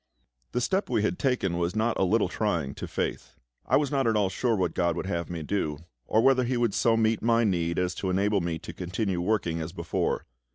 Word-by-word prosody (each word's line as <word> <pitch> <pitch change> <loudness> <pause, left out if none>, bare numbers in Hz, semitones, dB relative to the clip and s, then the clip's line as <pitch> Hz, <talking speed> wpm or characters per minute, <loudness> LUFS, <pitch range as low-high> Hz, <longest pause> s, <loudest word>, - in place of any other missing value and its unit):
The 125 - 0
step 190 - 0
we - - +1
had 180 - -1
taken 110 - 0
was 85 +3 -1
not 110 +2 +1
a - - +3
little 105 +2 +3
trying 85 -8 -1
to - - -6
faith. - - -3 0.3
I - - +4
was 145 -2 0
not 135 -3 +1
at 110 - +2
all 100 -3 +2
sure 115 +4 0
what 90 -4 0
GOD 85 -2 +1
would 90 - -3
have 85 -4 -2
me 85 -3 -4
do, 75 -4 -1 0.3
or 110 +1 +3
whether 130 -1 +5
He 125 +1 0
would 120 -4 +1
so 115 +2 +3
meet 110 -1 +2
my 115 0 +3
need 85 -5 0
as 90 0 0
to 95 - -1
enable 100 +2 +2
me 85 -1 -2
to 80 - -9
continue 95 0 -2
working 90 -4 0
as 80 +2 -5
before. 85 -3 -2
100 Hz, 235 wpm, -27 LUFS, 85-115 Hz, 0.3 s, whether